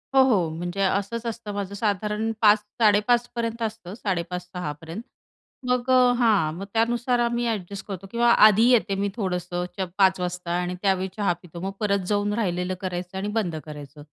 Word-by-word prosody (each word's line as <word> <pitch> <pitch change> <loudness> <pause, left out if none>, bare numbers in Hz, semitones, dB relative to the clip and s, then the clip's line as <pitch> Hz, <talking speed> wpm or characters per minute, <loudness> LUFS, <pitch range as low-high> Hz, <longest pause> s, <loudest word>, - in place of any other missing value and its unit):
हो, 265 - +8
हो. 200 -11 +2
म्हणजे 175 +4 -4
असंच 200 +4 0
असतं 230 -2 -5
माझं. 200 -1 -4
साधारण 210 +1 -1
05.00-05.30 210 +2 +3
पर्यंत 230 0 -3
असतं, 220 -4 -4
05.30-06.00 180 -5 -3
पर्यंत. 165 +6 -7 0.7
मग 250 0 0
अ, 250 -1 +6
हां, 210 -10 +3
मग 195 - -6
त्यानुसार 240 +2 +1
आम्ही 240 0 0
अ‍ॅडजस्ट 200 -3 -4
करतो 195 -1 -6
किंवा 235 0 +3 0.2
आधी 215 +3 +4
येते 215 -5 +3
मी 200 +1 -1
थोडंसंच 180 -2 -3 0.2
05.00 190 -2 +4
वाजता 180 -1 -4
आणि 180 0 -3
त्यावेळी 190 -2 +1
चहा 200 -4 +2
पितो. 175 -1 -11
मग 195 - -3
परत 200 -3 0
जाऊन 205 0 0
राहिलेलं 180 -4 -1
करायचं 180 0 -4
आणि 195 +2 -3
बंद 175 -7 -2
करायचं, 150 -1 -10
200 Hz, 165 wpm, -24 LUFS, 180-225 Hz, 0.7 s, हो